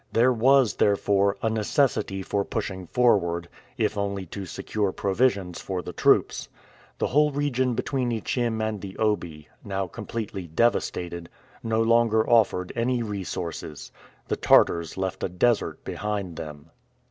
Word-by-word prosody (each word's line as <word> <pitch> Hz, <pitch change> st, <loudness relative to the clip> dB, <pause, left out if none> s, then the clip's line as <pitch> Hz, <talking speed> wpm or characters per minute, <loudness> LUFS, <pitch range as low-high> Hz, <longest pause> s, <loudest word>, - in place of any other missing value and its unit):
There 125 Hz, +3 st, +4 dB
was, 130 Hz, +1 st, +4 dB
therefore, 100 Hz, -1 st, +2 dB
a 115 Hz, -, +2 dB
necessity 110 Hz, -3 st, 0 dB
for 100 Hz, +1 st, -1 dB
pushing 95 Hz, -2 st, -4 dB
forward, 85 Hz, -9 st, +2 dB, 0.3 s
if 105 Hz, -3 st, 0 dB
only 100 Hz, -1 st, -2 dB
to 95 Hz, +2 st, -7 dB
secure 100 Hz, +3 st, -2 dB
provisions 100 Hz, -3 st, 0 dB
for 95 Hz, -2 st, -4 dB
the -, -, -7 dB
troops. -, -, +2 dB, 0.5 s
The -, -, 0 dB
whole 150 Hz, +3 st, +3 dB
region 130 Hz, -3 st, 0 dB
between 130 Hz, -1 st, -1 dB
Ichim 115 Hz, 0 st, -1 dB
and 105 Hz, -3 st, -4 dB
the 95 Hz, -1 st, -8 dB
Obi, 85 Hz, -8 st, -1 dB, 0.2 s
now 95 Hz, -1 st, -2 dB
completely 100 Hz, -1 st, -6 dB
devastated, 85 Hz, -2 st, 0 dB, 0.3 s
no 115 Hz, 0 st, +1 dB
longer 115 Hz, -1 st, +3 dB
offered 105 Hz, -6 st, +3 dB
any 120 Hz, +1 st, 0 dB
resources. 90 Hz, -7 st, -5 dB, 0.4 s
The -, -, -1 dB
Tartars 85 Hz, 0 st, +3 dB
left 95 Hz, 0 st, -3 dB
a -, -, 0 dB
desert 110 Hz, +6 st, 0 dB
behind 100 Hz, -4 st, -3 dB
them. 75 Hz, 0 st, -9 dB
105 Hz, 135 wpm, -25 LUFS, 95-115 Hz, 0.5 s, There